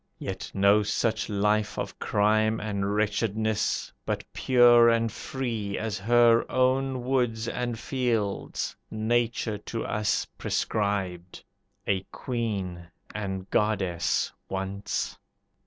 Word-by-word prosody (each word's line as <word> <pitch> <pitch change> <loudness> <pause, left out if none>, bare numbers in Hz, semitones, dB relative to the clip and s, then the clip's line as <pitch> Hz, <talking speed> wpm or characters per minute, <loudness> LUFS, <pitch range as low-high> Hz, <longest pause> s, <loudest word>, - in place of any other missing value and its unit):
Yet - - -5
no 100 +2 +5
such 110 +2 0
life 105 +1 +1
of - - -4
crime 110 +1 +2
and 100 -1 -2
wretchedness, 110 0 0
But - - -2
pure 120 -2 +6
and 115 -1 +2
free 115 -5 -3
as 110 -2 -3
her 120 +2 +5
own 130 0 +1
woods 120 -3 0
and 120 -1 -2
fields, 115 -5 -2
Nature 110 -1 0
to 115 +2 -5
us 105 -2 0
prescribed; 95 -4 -2 0.4
a 95 -2 +1
queen 100 -8 -3 0.3
And 95 -3 -4
goddess 95 -6 +1 0.2
once. 95 +1 -3
110 Hz, 105 wpm, -27 LUFS, 100-120 Hz, 0.4 s, pure